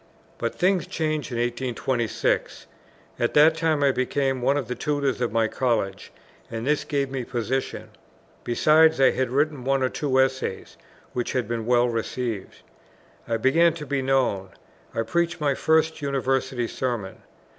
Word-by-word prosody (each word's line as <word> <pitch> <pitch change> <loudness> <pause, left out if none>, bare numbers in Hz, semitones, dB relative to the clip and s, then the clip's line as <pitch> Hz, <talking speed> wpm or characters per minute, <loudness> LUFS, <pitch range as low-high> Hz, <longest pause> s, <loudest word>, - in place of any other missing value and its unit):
But - - -2
things 185 -1 +1
changed 155 -4 -2
in 120 - -3
1826. 120 -1 -1 0.5
At 120 - 0
that 155 +2 +6
time 160 -3 +1
I 140 - +5
became 130 +1 -1
one 135 +3 +2
of 135 -5 -3
the 125 - -2
Tutors 140 -2 -1
of 120 - 0
my 115 0 +2
College, 110 -6 -1 0.4
and 115 0 -5
this 150 +1 +1
gave 140 -2 -1
me 135 -2 -3
position; 125 +2 -3 0.5
besides, 155 +5 +4
I 135 - +6
had 130 -1 -1
written 145 +1 0
one 135 0 +1
or 130 - +2
two 130 -2 0
Essays 130 -6 -1 0.4
which 120 -1 -2
had 125 -4 -1
been 115 -1 -3
well 120 0 +4
received. 115 -2 -4 0.6
I 115 0 0
began 160 +8 +3
to 155 -3 -7
be 140 -1 -1
known. 130 -8 +1 0.5
I 115 - 0
preached 170 +8 -1
my 145 -2 +1
first 160 +2 +1
University 135 -3 -1
Sermon. 115 -8 -3
130 Hz, 155 wpm, -24 LUFS, 120-145 Hz, 0.6 s, that